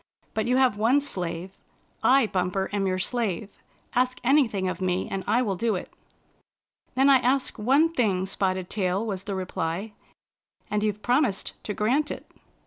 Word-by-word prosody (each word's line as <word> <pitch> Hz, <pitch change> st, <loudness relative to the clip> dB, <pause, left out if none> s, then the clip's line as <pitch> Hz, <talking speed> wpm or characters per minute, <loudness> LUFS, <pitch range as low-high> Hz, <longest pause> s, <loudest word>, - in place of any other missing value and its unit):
But 220 Hz, -, -1 dB
you 250 Hz, +1 st, +3 dB
have 255 Hz, -6 st, +3 dB
one 240 Hz, +6 st, +4 dB
slave. 180 Hz, -9 st, -3 dB, 0.5 s
I, 270 Hz, -1 st, +5 dB
Bumper, 190 Hz, -1 st, -1 dB
am 200 Hz, -1 st, 0 dB
your 185 Hz, 0 st, 0 dB
slave. 205 Hz, -2 st, -1 dB, 0.4 s
Ask 255 Hz, +1 st, +1 dB
anything 240 Hz, -8 st, +3 dB
of 185 Hz, -, -3 dB
me, 185 Hz, 0 st, 0 dB
and 195 Hz, -1 st, -4 dB
I 235 Hz, +4 st, +3 dB
will 200 Hz, -5 st, -1 dB
do 220 Hz, +3 st, 0 dB
it." 180 Hz, -, -6 dB, 0.5 s
" -, -, -47 dB
Then 265 Hz, +2 st, +4 dB
I 275 Hz, -1 st, +7 dB
ask 255 Hz, 0 st, 0 dB
one 270 Hz, +9 st, +4 dB
thing. 210 Hz, -, 0 dB
Spotted 190 Hz, -1 st, -1 dB
Tail," 195 Hz, +1 st, -1 dB
was 195 Hz, -3 st, -4 dB
the 200 Hz, -, -3 dB
reply, 185 Hz, +2 st, -3 dB, 0.4 s
" -, -, -40 dB
and 210 Hz, 0 st, 0 dB
you've 210 Hz, -1 st, -1 dB
promised 245 Hz, -5 st, +1 dB
to 210 Hz, -, -3 dB
grant 265 Hz, +8 st, +1 dB
it." -, -, -6 dB
210 Hz, 175 wpm, -26 LUFS, 190-250 Hz, 0.5 s, I